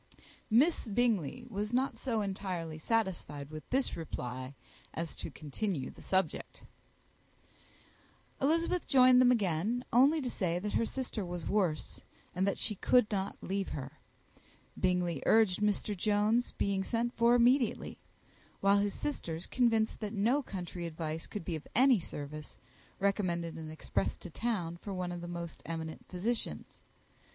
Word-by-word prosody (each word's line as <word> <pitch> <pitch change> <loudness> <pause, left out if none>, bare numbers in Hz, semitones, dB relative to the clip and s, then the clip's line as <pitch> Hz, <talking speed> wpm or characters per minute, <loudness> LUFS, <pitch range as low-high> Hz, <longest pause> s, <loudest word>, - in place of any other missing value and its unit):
Miss 265 +5 +4
Bingley 230 - +1
was 210 -2 -3
not 260 +2 +1
so 230 -5 -1
entirely 185 -5 -3
satisfied 160 -8 -1
with 155 0 -8
this 265 +1 +1
reply 130 -4 -5 0.4
as 165 -1 -3
to - - -5
continue 155 -1 -3
the - - -15
subject. 190 0 -1 1.8
Elizabeth 330 +5 +1
joined 255 -2 +7
them 250 - +6
again 215 +2 +1
only 275 +7 +6
to 265 - -3
say 180 -8 -1
that 205 +3 -3
her 230 - +2
sister 250 -5 -3
was 175 -2 -5
worse, 180 -7 0 0.3
and 185 +2 +1
that 200 - +1
she 215 - +1
could 225 +3 +3
not 195 -1 -2
leave 195 0 -1
her. 135 -2 -6 0.8
Bingley 180 -5 +1
urged 215 -4 +5
Mr. 210 0 +1
Jones's 210 +5 +2
being 195 -1 0
sent 235 +3 -1
for 235 +1 +4
immediately; 245 0 +3 0.6
while 200 +1 +4
his 200 -1 0
sisters, 170 - -3
convinced 225 -3 +2
that 210 -1 -4
no 230 +8 +2
country 180 -6 -5
advice 160 0 -4
could 205 -6 -6
be 170 - -2
of 155 - -7
any 255 -2 +6
service, 150 -2 -7 0.4
recommended 180 -4 0
an 160 -1 -7
express 105 -10 -2
to 180 - -10
town 180 -6 -2
for 195 +2 -6
one 180 -1 -2
of 175 -1 -5
the 175 - -6
most 170 -1 -6
eminent 160 -1 -5
physicians. 190 - -3
195 Hz, 145 wpm, -32 LUFS, 170-235 Hz, 1.8 s, joined